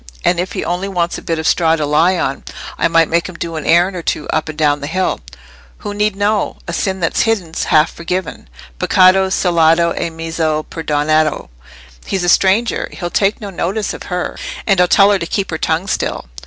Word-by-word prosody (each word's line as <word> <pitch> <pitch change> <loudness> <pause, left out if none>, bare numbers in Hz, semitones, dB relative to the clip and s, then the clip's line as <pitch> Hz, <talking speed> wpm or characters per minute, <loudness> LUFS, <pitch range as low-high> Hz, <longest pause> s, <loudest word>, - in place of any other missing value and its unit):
And 175 - +2
if 180 +1 -3
he - - -3
only 180 +3 -2
wants 175 -3 -2
a - - -13
bit 165 - -2
of 160 - -4
straw 165 -1 +3
to 155 -2 -2
lie 165 +5 +3
on, 135 -4 -2 0.3
I - - +1
might 165 -1 +3
make 170 +2 0
him 185 - -10
do 165 -1 -5
an 155 - -5
errand 175 +3 +3
or 175 - -4
two 155 - -3
up 155 0 -1
and 155 - -7
down 145 -1 +1
the 145 - -4
hill. 185 +4 -1 0.6
Who 205 -2 -6
need 210 0 0
know? 205 +1 0
And 170 - -4
sin 190 -1 -2
that's 165 - +1
hidden's 195 -8 -1
half 155 +1 +3
forgiven. 180 - -5 0.3
('Peccato 190 +1 +4
celato 170 -2 +3
e 170 - -2
mezzo 160 -1 -2
perdonato.') 155 - 0 0.5
He's 190 -2 -2
a 175 - +1
stranger: 200 +6 +2
he'll 175 -2 -5
take 200 +1 +1
no 205 -2 -7
notice 195 +4 -2
of - - -9
her. 180 -1 -3 0.3
And 195 -4 +3
I'll 180 - +4
tell 200 +3 +5
her 200 - +2
to 170 - -4
keep 195 0 -2
her 160 - -3
tongue 165 +3 0
still." 195 - -2
170 Hz, 210 wpm, -16 LUFS, 160-190 Hz, 0.6 s, tell